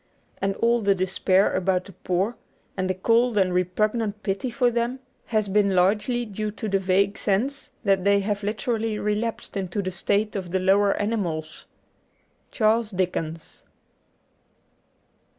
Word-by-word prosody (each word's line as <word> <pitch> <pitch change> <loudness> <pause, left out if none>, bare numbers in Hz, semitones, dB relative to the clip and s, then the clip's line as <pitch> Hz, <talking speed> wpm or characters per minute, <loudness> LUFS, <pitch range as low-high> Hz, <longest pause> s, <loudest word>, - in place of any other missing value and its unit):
And 195 0 0
all 235 +2 +2
the 200 -1 +3
despair 190 +1 +2
about 185 0 +1
the 195 - -11
poor, 190 +6 -1 0.4
and 185 -1 -2
the 185 - 0
cold 230 +4 +2
and 185 -2 +3
repugnant 210 +4 0
pity 195 +6 -2
for 245 0 +1
them, 240 +2 -1 0.3
has 215 -3 0
been 200 -1 +2
largely 210 +7 +2
due 215 0 -4
to 215 +1 -5
the 195 -1 +1
vague 195 +2 +1
sense 250 +9 -1
that 195 -3 +2
they 200 0 +4
have 205 0 -2
literally 215 +1 -2
relapsed 210 +2 -2
into 190 0 -3
the 185 - -3
state 205 +4 0
of 185 -3 -4
the 190 +2 0
lower 195 +2 +3
animals. 175 -8 -3 0.8
^Charles 220 -3 +1
Dickens.' 165 -3 -3
200 Hz, 145 wpm, -24 LUFS, 185-220 Hz, 0.8 s, they